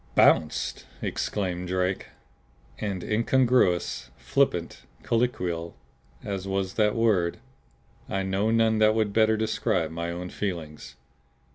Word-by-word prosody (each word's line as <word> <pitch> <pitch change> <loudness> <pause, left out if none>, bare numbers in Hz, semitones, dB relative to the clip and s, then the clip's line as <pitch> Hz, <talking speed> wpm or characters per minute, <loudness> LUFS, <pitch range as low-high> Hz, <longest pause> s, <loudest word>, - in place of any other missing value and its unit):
"Bounced!" 75 - +3 0.2
exclaimed 90 -3 -2
Drake. 95 +1 -1 0.7
And 100 -4 -3
incongruous, 115 - +2
flippant, - - 0 0.2
colloquial 90 -10 -1 0.5
as 100 -1 -4
was 95 -1 -1
that 105 -1 +2
word, 100 -7 +2 0.7
I 95 0 -1
know 95 +3 0
none 115 -1 +3
that 110 0 +5
would 110 -2 0
better 110 0 +4
describe 110 -6 0
my 85 +1 -3
own 90 +1 -5
feelings. 85 -7 -5
95 Hz, 110 wpm, -26 LUFS, 90-110 Hz, 0.7 s, that